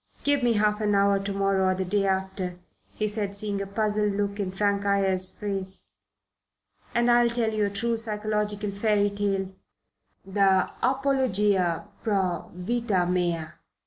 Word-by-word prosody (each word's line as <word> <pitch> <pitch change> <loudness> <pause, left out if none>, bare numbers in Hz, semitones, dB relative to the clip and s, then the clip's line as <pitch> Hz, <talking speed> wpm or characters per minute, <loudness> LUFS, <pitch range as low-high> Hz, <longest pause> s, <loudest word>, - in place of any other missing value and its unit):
Give 285 -1 +2
me 240 -1 +3
half 210 0 +1
an 210 -1 +2
hour 200 0 +3
to 195 +1 -4
morrow 195 -1 +1
or 185 - +2
the 190 0 -2
day 195 +2 +1
after," 190 -1 -2 0.4
he 215 - -1
said, 205 -1 -3
seeing 200 -1 -2
a 195 - -4
puzzled 210 0 0
look 200 0 -2
in 195 -2 -1
Frank 200 +1 0
Ayres's 195 -2 +1
face, 195 -1 -5 1.1
"and 235 0 +3
I'll 240 0 +5
tell 235 -2 0
you 215 -1 +1
a - - 0
true 230 +4 -1
psychological 210 -2 -1
fairy 205 0 +1
tale 195 -2 -2 0.7
the 195 -1 +2
apologia 210 -10 +1 0.2
pro 190 -6 -1
vita 195 0 -1
mea. 175 -2 0
200 Hz, 150 wpm, -26 LUFS, 190-215 Hz, 1.1 s, I'll